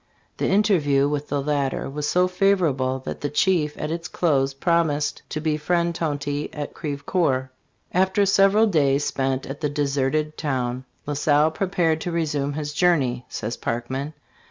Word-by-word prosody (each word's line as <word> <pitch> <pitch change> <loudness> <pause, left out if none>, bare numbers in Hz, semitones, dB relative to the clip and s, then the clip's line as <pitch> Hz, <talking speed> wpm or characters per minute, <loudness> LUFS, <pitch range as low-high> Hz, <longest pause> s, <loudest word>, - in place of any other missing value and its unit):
The - - 0
interview 165 -9 +3
(with 145 0 -2
the 140 -1 -1
latter) 140 -2 -1
was 145 +2 -3
so 180 +1 +3
favorable 175 -9 +1
that - - -5
the 145 - -1
chief 150 0 +1
at 150 - -3
its 165 0 -4
close 140 -5 +1
promised 150 -1 +1
to 155 - -3
be 155 -1 0
friend 170 +2 0
Tonty 145 -2 -2
at 150 -1 -5
Crevecoeur 140 -3 -1 0.4
"After 190 +2 +3
several 195 +2 +5
days 145 -7 +2
spent 135 -1 -1
at 135 +3 -7
the 150 - 0
deserted 145 +1 -1
town, 130 -3 -2 0.2
La 145 - -2
Salle 150 +2 +3
prepared 165 -2 0
to 175 - -3
resume 150 -4 -1
his 150 0 -4
journey," 140 -8 +2
says 115 +2 -4
Parkman. 130 +6 -3
150 Hz, 155 wpm, -23 LUFS, 140-170 Hz, 0.4 s, several